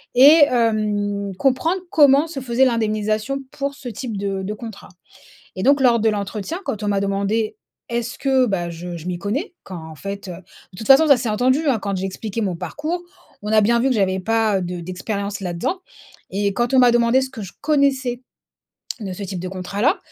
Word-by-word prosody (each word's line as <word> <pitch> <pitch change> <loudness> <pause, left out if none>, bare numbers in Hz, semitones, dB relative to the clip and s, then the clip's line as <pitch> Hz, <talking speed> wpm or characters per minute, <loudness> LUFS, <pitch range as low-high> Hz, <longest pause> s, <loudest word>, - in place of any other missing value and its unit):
et 290 +5 +8
hem, 205 -4 0
comprendre 320 +7 +1
comment 290 -2 +5
se 310 -4 -6
faisait 250 +1 +2
l'indemnisation 215 +1 0
pour 280 0 -3
ce 265 -3 -7
type 225 -1 -5
de 195 -1 -2
de 210 +2 -3
contrat 220 -2 -9 0.7
et 185 - -3
donc 280 +2 +4
lors 240 -3 +4
de 220 - +3
l'entretien 210 - -4
quand 215 - -4
on 210 - -1
m'a 200 -1 +1
demandé, 200 +2 -1 0.3
est-ce 235 0 -3
que 265 -2 +2
bah 175 -5 -1
je 170 +1 -7
je 165 +1 -9
m'y 175 -1 -3
connais. 260 - -3
Quand 185 - -8
en 160 - -10
fait, 200 +1 -6
heu 175 - -5 0.4
de 180 - -13
toute 220 - -6
façon 275 +4 +7
ça 280 - +7
s'est 235 - -2
entendu 255 +6 +2
hein, 245 -5 +2
quand 200 -1 -2
j'expliquais 195 +4 -4
mon 185 -4 -1
parcours, 320 - -4 0.4
on 210 - -3
a 215 - +6
bien 235 +3 +3
vu 265 - +2
que 255 - +2
j'avais 190 -2 +1
pas, 220 -1 +1
heu, - - -3
de 175 0 -4
d'expérience 200 +3 -4
là-dedans. 180 - -3 0.5
Et 200 +1 0
quand 240 +2 0
on - - +5
m'a 245 - +6
demandé 240 +2 +4
ce 260 - -4
que 225 -6 -8
je 190 - -8
connaissais, 270 -4 +1 0.8
de 195 -3 -5
ce 200 - -7
type 185 -2 -5
de 185 - -4
contrat 190 +2 -5
là. - - +3
215 Hz, 210 wpm, -21 LUFS, 195-260 Hz, 0.8 s, et